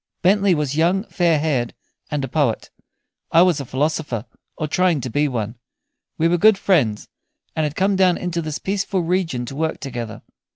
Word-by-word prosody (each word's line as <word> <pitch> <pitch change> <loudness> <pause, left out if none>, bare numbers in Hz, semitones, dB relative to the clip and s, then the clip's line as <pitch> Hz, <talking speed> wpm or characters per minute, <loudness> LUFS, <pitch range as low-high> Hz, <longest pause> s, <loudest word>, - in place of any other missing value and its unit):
Bentley 195 0 +4
was 145 -2 -1
young, 175 +5 +2
fair 170 -3 +2
haired, 140 -6 -1 0.3
and 145 -2 -2
a - - -2
poet; 135 -4 0 0.6
I 165 - +7
was 180 -5 +2
a 140 - -5
philosopher, 135 -3 -2 0.3
or 155 - -2
trying 175 0 +2
to 125 - -5
be 145 +5 +2
one. 115 -3 -4 0.6
We 165 - +3
were 175 +1 +2
good 215 +2 +6
friends, 145 - +1 0.5
and 155 - +1
had 150 0 -3
come 195 +1 +2
down 185 -2 +4
into 175 -1 -2
this 155 -1 -4
peaceful 195 -1 -1
region 165 -8 -1
to 135 - -8
work 160 +2 -2
together. 120 -5 -6
155 Hz, 180 wpm, -21 LUFS, 135-180 Hz, 0.6 s, I